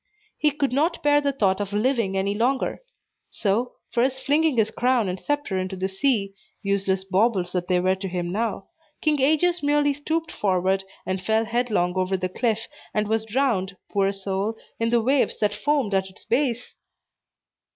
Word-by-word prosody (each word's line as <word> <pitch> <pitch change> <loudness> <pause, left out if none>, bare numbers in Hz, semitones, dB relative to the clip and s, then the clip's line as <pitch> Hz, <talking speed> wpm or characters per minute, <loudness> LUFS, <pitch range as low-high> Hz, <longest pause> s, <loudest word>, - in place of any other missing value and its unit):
He 300 - +4
could 280 -3 -1
not 320 +6 +1
bear 290 0 +4
the 285 -1 +1
thought 200 -7 +1
of 200 0 -4
living 215 -3 +1
any 195 +1 0
longer; 250 - 0 0.5
so, 230 +4 -1 0.2
first 260 +2 0
flinging 300 -1 +2
his 220 -1 +2
crown 245 -3 +2
and 180 0 -3
sceptre 290 -9 -1
into 185 +1 -3
the 190 +1 -1
sea 195 0 0 0.3
(useless 195 -1 0
baubles 190 -1 +1
that 180 -1 -2
they 180 -1 +3
were 185 +1 +2
to 190 +1 -4
him 175 -1 -3
now), 210 -1 -2 0.3
King 300 -3 +2
Aegeus 325 +5 +3
merely 290 0 +2
stooped 315 +3 -2
forward, 190 0 +1 0.2
and 190 0 -2
fell 220 +3 +1
headlong 225 -6 0
over 185 +1 +1
the 185 0 -2
cliff, 225 +2 -1 0.3
and 210 0 +1
was 220 +1 0
drowned, 215 -6 0
poor 195 -1 +2
soul, 195 +2 -2 0.2
in 230 0 +1
the 235 -1 +2
waves 265 +2 +2
that 205 -1 +1
foamed 255 0 0
at 190 0 +1
its 190 - -18
base! 245 0 0
220 Hz, 175 wpm, -24 LUFS, 190-265 Hz, 0.5 s, He